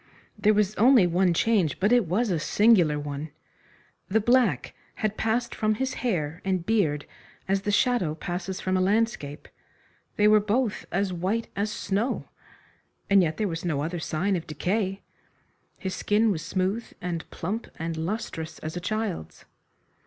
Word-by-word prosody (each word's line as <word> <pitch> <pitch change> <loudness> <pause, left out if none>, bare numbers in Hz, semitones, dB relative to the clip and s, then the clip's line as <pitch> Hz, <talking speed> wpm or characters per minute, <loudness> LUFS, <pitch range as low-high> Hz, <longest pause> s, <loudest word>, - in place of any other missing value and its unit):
There 215 0 +3
was 210 -1 +2
only 240 -3 +6
one 175 +1 +2
change, 180 -4 +2
but 205 +4 +2
it 245 -6 +4
was 205 +6 +1
a 170 - +1
singular 180 -4 +4
one. 145 +1 -5 0.8
The 220 +3 +3
black 230 - +2 0.2
had 215 -1 -1
passed 230 +2 0
from 215 0 +1
his 265 +4 -2
hair 170 -9 -1
and 185 -3 -1
beard 170 -10 +1 0.4
as 195 0 +1
the 205 - -1
shadow 205 -8 +2
passes 180 +3 -4
from 185 0 -1
a 185 - +2
landscape. 195 -7 0 0.7
They 210 - +4
were 215 0 +6
both 215 +2 -1
as 195 0 0
white 190 +7 -1
as 200 +2 -1
snow. 210 +5 -2 0.8
And 200 -1 +7
yet 160 -3 0
there 215 - 0
was 165 -2 -4
no 150 -5 -1
other 170 +2 -3
sign 180 +5 0
of 170 - -4
decay. 195 +4 -1 0.7
His 190 -1 -4
skin 215 +1 +2
was 165 -5 -2
smooth 190 +5 -1 0.2
and 175 -2 -4
plump 210 +7 -4
and 165 0 -3
lustrous 160 -2 -4
as 155 +2 -6
a - - -2
child's. 210 - -4
190 Hz, 160 wpm, -26 LUFS, 170-215 Hz, 0.8 s, And